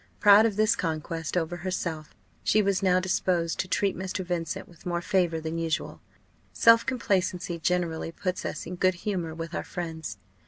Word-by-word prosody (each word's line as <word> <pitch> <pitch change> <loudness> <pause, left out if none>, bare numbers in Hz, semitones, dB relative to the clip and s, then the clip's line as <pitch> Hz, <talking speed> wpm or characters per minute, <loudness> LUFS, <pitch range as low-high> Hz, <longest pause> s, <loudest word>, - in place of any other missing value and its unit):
Proud 205 +1 +7
of 215 - -3
this 215 +1 +3
conquest 165 0 -3
over 175 0 -1
herself, 170 -3 -4 0.3
she 215 - +3
was 195 -1 +1
now 185 -1 +4
disposed 180 -2 0
to 190 - -1
treat 195 +1 +1
Mr. 185 0 -4
Vincent 175 -2 -3
with 170 -2 -18
more 175 -1 -1
favour 175 -3 +1
than 160 +1 -4
usual. 165 0 -2 0.5
Self 230 0 +6
complacency 185 -8 -1
generally 170 -2 -1
puts 185 +1 -3
us - - -4
in 180 +2 -6
good 185 0 +3
humour 175 -6 -2
with 165 +1 -6
our - - -2
friends. 165 -3 -5
180 Hz, 170 wpm, -27 LUFS, 165-190 Hz, 0.5 s, Proud